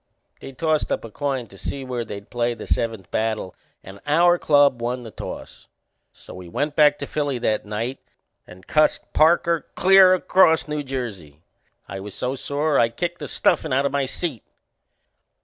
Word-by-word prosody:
They - - -9
tossed 155 +3 -1
up - - -2
a 115 - -10
coin 135 -1 -2
to 100 -3 -16
see 135 -1 -5
where 125 -2 -3
they'd 100 -2 -9
play 120 -1 -1
the 110 - -9
seventh 110 -6 -2
battle 110 -4 -2 0.3
and 95 +1 -11
our 175 +4 +4
club 145 -4 +3
won 125 +1 -3
the 115 - -9
toss; - - -9 0.4
so - - -14
we 90 -1 -10
went 145 - -2
back 150 -1 +5
to - - -5
Philly 145 -3 -2
that 110 -3 -1
night 115 +5 -4 0.5
and 90 +1 -14
cussed 155 0 +1
Parker 165 +1 +3
clear 190 0 +6
across 180 -3 +3
New 150 0 -3
Jersey. 105 - -6 0.4
I 95 - -6
was 100 0 -8
so 125 +1 -2
sore 145 +2 0
I 115 - +4
kicked 175 +9 -4
the 150 - -6
stuffin' - - +1
out 135 +2 +2
o' - - +2
my 140 -1 -1
seat. 140 -4 -4
130 Hz, 180 wpm, -22 LUFS, 110-150 Hz, 0.5 s, clear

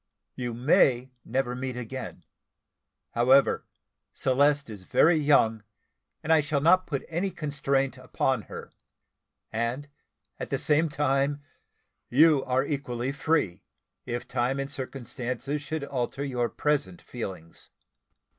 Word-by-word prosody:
You 120 -2 -4
may 125 0 +3
never 130 -2 -1
meet 130 -1 -4
again. 125 +2 -6 0.9
However, 130 +3 +4 0.5
Celeste 140 0 +2
is 105 -3 -9
very 160 - +4
young, 115 -8 +3 0.6
and 160 - +3
I 160 - +5
shall 145 0 0
not 185 +5 +4
put 140 -3 -3
any 175 +4 -1
constraint 140 -5 -1
upon 130 -1 0
her; - - -8 0.8
and 115 +5 -2 0.5
at - - -5
the - - 0
same 155 +2 +2
time 145 0 0 0.7
you 150 +1 +5
are 130 +1 +1
equally 135 -3 -2
free, 145 - 0 0.5
if 120 0 -4
time 125 +2 0
and 135 0 -3
circumstances 130 +1 -4
should 155 0 -4
alter 135 0 -3
your 125 -3 -1
present 150 +4 -1
feelings." 95 - -8
135 Hz, 120 wpm, -27 LUFS, 125-145 Hz, 0.9 s, I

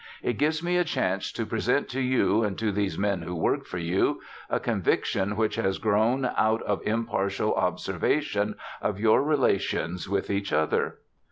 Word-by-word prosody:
"It 120 - -1
gives 155 +2 +1
me 175 +1 +1
a 180 - +4
chance 165 - -1
to - - -2
present - - 0
to 130 - -3
you, 125 -4 +2
and 105 -2 -2
to 110 -2 0
these 100 -1 -1
men 100 -3 0
who 90 +2 -5
work 80 - 0
for 90 - -5
you, 85 +2 +1 0.3
a - - +1
conviction 100 +2 0
which 110 0 0
has 95 0 0
grown 110 +5 +2
out 110 +1 +2
of 105 - -1
impartial 105 -2 0
observation 95 - 0 0.3
of 100 -1 -1
your 110 +3 +4
relations 100 - 0
with 100 0 -1
each 100 0 -1
other. 80 0 +1
105 Hz, 170 wpm, -27 LUFS, 95-115 Hz, 0.3 s, a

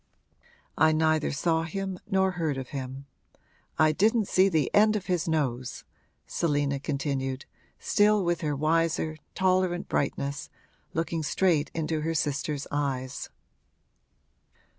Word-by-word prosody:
I 155 +1 +5
neither 155 -1 +2
saw 160 +3 +1
him 190 +2 -4
nor 190 0 +2
heard 160 -6 -2
of 130 -2 -6
him. 135 0 -6 0.7
I 155 -1 +5
didn't 215 +5 +2
see 190 +1 +4
the 155 -7 0
end 215 +1 +5
of 205 -2 -2
his 180 -3 0
nose!' 130 -6 -1 0.4
Selina 145 -3 0
continued, 135 -2 -2 0.3
still 205 -2 +3
with 170 0 0
her 150 -3 -1
wiser, 160 +1 +1 0.2
tolerant 185 -1 +1
brightness, 140 0 -2 0.5
looking 165 0 -1
straight 155 -1 +1
into 160 -1 -1
her 165 +1 -1
sister's 145 -1 -1
eyes. 135 -3 -2
155 Hz, 120 wpm, -27 LUFS, 145-180 Hz, 0.7 s, I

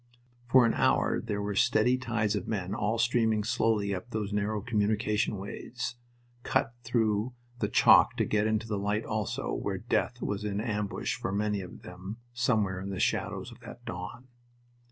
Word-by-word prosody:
For 125 0 +6
an 115 - +3
hour - - +2
there 105 -3 -3
were 105 0 -2
steady 125 +3 +3
tides 115 -4 0
of 100 - -3
men 95 -3 -2
all 110 +1 0
streaming 115 -2 +2
slowly 105 -2 +1
up 110 +6 -5
those 105 -3 -3
narrow 105 +1 0
communication 105 -1 0
ways, 115 +6 -5 0.5
cut 120 - 0
through 115 0 0 0.2
the - - +1
chalk - - +6
to - - +2
get 105 0 +1
into 110 0 0
the 105 -2 -1
light 105 +2 -1
also, 110 -2 -2
where - - -2
death - - -1
was 100 0 -2
in 105 -1 -2
ambush 105 -2 -2
for - - -3
many 105 0 0
of 90 - -10
them 95 +4 -8 0.2
somewhere 110 -7 +1
in 100 - -5
the 95 -2 -4
shadows - - -1
of - - -13
that 120 - -11
dawn. 105 +4 -6
105 Hz, 175 wpm, -29 LUFS, 100-115 Hz, 0.5 s, For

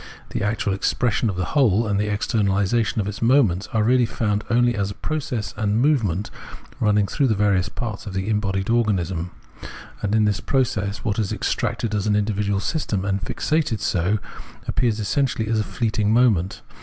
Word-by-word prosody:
The - - -3
actual 105 -1 0
expression 110 +3 0
of 100 - -3
the 90 -1 -1
whole, 115 -6 +3
and 100 -2 0
the 105 - 0
externalisation 105 +1 +1
of 105 -3 0
its 105 - -5
moments 115 -7 +3
are 110 -2 +1
really 125 +1 +3
found 105 -2 -1
only 120 +1 +3
as 100 -3 -1
a 100 - -7
process 145 -8 -3
and 105 -3 -1
a - - +2
movement, 115 - +1 0.5
running 105 -1 +3
throughout 135 +7 +1
the 110 - +2
various 100 -4 +2
parts 110 +1 -5
of 95 - -6
the 95 +1 -2
embodied 100 -2 0
organism; 95 -7 0 0.7
and 105 +1 0
in 110 -1 +4
this 105 -1 +1
process 110 -7 -1
what 105 -2 -1
is 105 -3 -1
extracted 110 -2 -1
as 105 0 0
an 105 - +2
individual 100 -1 0
system 105 - -2
and 100 0 -1
fixated 150 -5 -1
so, 90 +4 +1 0.5
appears 115 -4 0
essentially 115 0 0
as 110 0 +1
a - - +1
fleeting 105 0 -1
moment. 110 -7 +2
105 Hz, 180 wpm, -22 LUFS, 100-115 Hz, 0.7 s, in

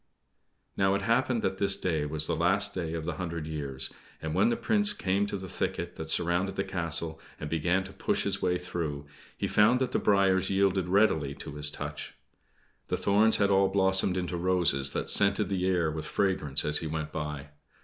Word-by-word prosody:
Now, 95 0 +2
it 100 - -2
happened 115 +1 +1
that 95 - -1
this 100 -1 +1
day 80 -5 -1
was 75 0 -1
the - - -1
last 90 +5 +2
day 85 -3 -3
of 80 -1 -4
the - - -4
hundred 85 -3 -4
years; 70 -4 -3 0.3
and 80 0 -4
when 225 - +3
the 235 - 0
Prince 210 -2 +2
came 100 +2 0
to 100 - -3
the 95 0 -8
thicket - - -3
that 80 0 -7
surrounded 90 +4 0
the 95 - -1
castle 85 -4 -3 0.2
and 75 - -6
began 90 +4 +1
to 95 +1 -11
push - - 0
his - - -1
way 90 0 +1
through, 80 -5 -4 0.3
he - - -2
found 105 +4 +4
that 130 - -1
the - - +1
briers 95 -2 +2
yielded 95 -2 +1
readily 80 -8 +2
to - - -7
his 75 0 0
touch. - - -6 0.7
The - - -1
thorns 105 +3 +3
had 100 -1 +2
all 95 0 +4
blossomed 95 -1 +2
into 90 -1 -2
roses 85 -7 +2
that - - -2
scented 100 +1 +3
the 95 -2 0
air 85 -4 +1
with 80 0 -5
fragrance 85 -8 0
as 75 0 +2
he 80 - -4
went 80 0 -4
by. 75 -2 -5
90 Hz, 200 wpm, -28 LUFS, 80-100 Hz, 0.7 s, found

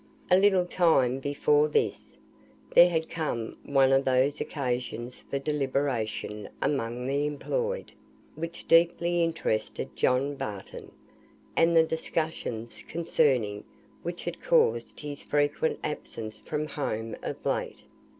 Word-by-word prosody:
A - - +8
little 190 -1 +4
time 150 -8 +3
before 145 +2 +2
this, 150 - -1 0.6
there 175 - +8
had 160 -2 -1
come 130 -8 -3
one 135 -1 +3
of 135 0 +4
those 130 +2 +2
occasions 125 -3 -3
for 140 - -1
deliberation 135 -7 -2
among 125 -3 -1
the 140 +2 0
employed, 485 - -2 0.4
which 165 +2 -7
deeply 170 +1 +4
interested 160 -10 -2
John 135 +3 +2
Barton; 105 -8 -7 0.6
and 165 +1 +4
the 165 - +8
discussions 160 -8 -3
concerning 135 -11 +1 0.4
which 175 +1 -5
had 175 0 -5
caused 120 -8 +2
his 145 -1 -5
frequent 145 +2 +1
absence 110 -7 -5
from 150 0 -3
home 115 -7 -3
of - - -6
late. - - -2
145 Hz, 120 wpm, -28 LUFS, 125-165 Hz, 0.6 s, A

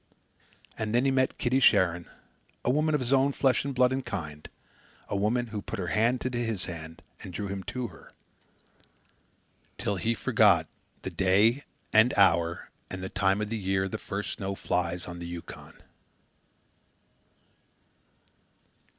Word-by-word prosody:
And 110 0 -1
then 125 +3 +3
he 135 - +3
met 130 -1 +1
Kitty 130 +1 +1
Sharon 90 -8 +3 0.6
a 125 - +3
woman 155 +2 +2
of 145 - 0
his 125 +2 0
own 135 +1 +3
flesh 135 -2 +2
and 140 -1 -4
blood 125 0 +4
and 135 0 -2
kind; 75 -11 -6 0.6
a - - -3
woman 110 +5 +1
who 105 - -3
put 115 - -6
her 90 -3 -3
hand 115 +4 +2
into 125 -2 -1
his 115 -5 -1
hand 80 -2 -8 0.2
and 95 - -8
drew 100 +3 -4
him 100 0 -4
to 125 -3 -4
her, - - -16 1.7
till 100 - -1
he 115 +4 0
forgot 105 -8 +4 0.4
the - - -4
day 105 +8 +3 0.3
and 110 +3 +5
hour 85 -3 +3 0.2
and 95 0 -6
the 95 - -4
time 95 +1 +1
of 105 0 -3
the 115 - -2
year 95 0 0
the - - -5
first 100 +1 -4
snow 100 0 -3
flies 90 -2 -2
on 85 -1 -8
the 85 - -6
Yukon. 85 -1 -9
105 Hz, 160 wpm, -28 LUFS, 95-125 Hz, 1.7 s, and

